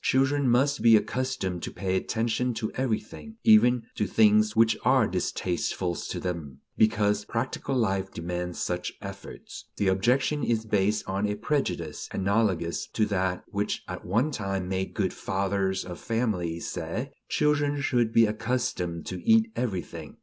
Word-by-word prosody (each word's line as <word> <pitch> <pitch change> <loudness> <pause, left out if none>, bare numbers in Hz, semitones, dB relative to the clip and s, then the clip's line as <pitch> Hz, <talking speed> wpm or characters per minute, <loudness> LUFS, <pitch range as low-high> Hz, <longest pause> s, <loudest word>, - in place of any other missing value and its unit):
Children 135 +1 +2
must 135 +3 +2
be 115 0 +7
accustomed 110 -6 -1
to - - -4
pay 95 -1 -2
attention 115 +4 0
to 110 -1 -3
everything, 130 - -4
even 125 - +6
to 105 - -1
things 110 0 +4
which 115 0 +4
are - - +4
distasteful 90 0 -1
to - - -5
them, 80 -7 -5
because 105 -1 +2
practical 130 +4 -3
life 95 -5 0
demands 90 +1 -4
such 90 0 -2
efforts. - - -9
The 100 -2 +2
objection 130 +9 +1
is 115 -2 0
based 105 0 +1
on 100 +2 0
a 105 - -1
prejudice 90 - -2
analogous 95 -4 0
to 110 - +2
that 95 -3 -1
which 100 +1 -2
at - - -6
one 115 - +1
time 95 -6 -3
made 95 0 -3
good 95 -4 0
fathers 95 0 -1
of 90 -1 -7
families 95 -8 -1
say: 90 +11 -4 0.2
"Children 145 -1 +1
should 120 -5 +1
be 115 0 +6
accustomed 105 -6 -2
to 90 - -5
eat 225 0 +4
everything." 90 - -4
105 Hz, 150 wpm, -27 LUFS, 95-125 Hz, 0.2 s, be